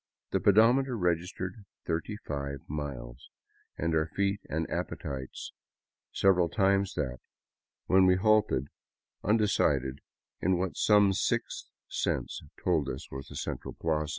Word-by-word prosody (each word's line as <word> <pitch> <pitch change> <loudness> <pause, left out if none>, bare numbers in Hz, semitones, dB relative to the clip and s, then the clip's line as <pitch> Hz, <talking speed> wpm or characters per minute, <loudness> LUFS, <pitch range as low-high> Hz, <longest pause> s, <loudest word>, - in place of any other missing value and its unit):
The - - +2
pedometer 120 +5 +4
registered 90 +2 -2 0.2
35 75 - -4
miles, 70 -5 -6 0.5
and 85 0 0
our 80 -1 +2
feet 100 +4 0
and 80 +1 -1
appetites 65 -2 -5 0.6
several 90 -3 +3
times 95 +2 +2
that, 65 -4 -2 0.7
when 95 0 +5
we 90 - +5
halted 105 - +2 0.5
undecided 75 - +2 0.4
in 95 0 +2
what 90 0 -2
some 105 -2 +5
sixth - - -1 0.2
sense - - -2 0.2
told 80 -6 +2
us 65 - -6
was 65 0 -7
the - - -11
central - - -5
plaza. 75 -2 0
85 Hz, 120 wpm, -30 LUFS, 70-100 Hz, 0.7 s, when